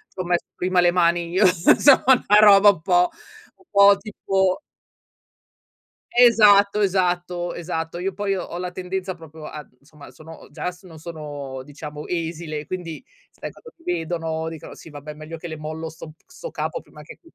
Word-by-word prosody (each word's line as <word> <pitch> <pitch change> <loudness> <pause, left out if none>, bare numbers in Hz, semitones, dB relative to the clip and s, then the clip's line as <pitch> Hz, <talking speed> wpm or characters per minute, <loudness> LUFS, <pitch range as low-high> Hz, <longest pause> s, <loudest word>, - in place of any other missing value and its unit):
C'ho 185 - -3
messo 175 -1 -1
prima 180 0 0
le 175 0 +4
mani 170 -1 +1
io", 190 +2 +3
insomma, 185 - +5
una 210 -5 +5
roba 205 -1 +8
un 180 -6 +1
po' 180 0 +3 0.5
un 380 - -26 0.2
po' 200 0 +6
tipo 195 -1 -1 1.6
Esatto, 210 -4 +6
esatto, 180 -2 0
esatto. 165 0 -5
Io 190 +1 -3
poi 200 0 -2
ho 175 -1 -6
la 180 0 -4
tendenza 185 +1 -4
proprio 160 -2 -13
a 150 -3 -9
insomma, 145 0 -16
sono 160 +1 -14
già 180 +4 -4
s 180 - -19
non 165 -3 -13
sono 145 -5 -7
diciamo 150 +1 -9
esile, 160 -3 -4
quindi 175 +3 -6 0.3
sai, - - -9
quando 475 - -15
mi 175 - 0
vedono 165 -1 -3
dicono: 160 -2 -10
"Sì, - - -13
vabbè, 150 +1 -9
meglio 155 +2 -9
che 170 - -8
le 160 -1 -7
mollo 155 +1 -6
'sto 160 0 -11
p - - -34
'sto - - -9
capo - - -4
prima - - -15
che" - - -13
175 Hz, 175 wpm, -22 LUFS, 160-190 Hz, 1.6 s, roba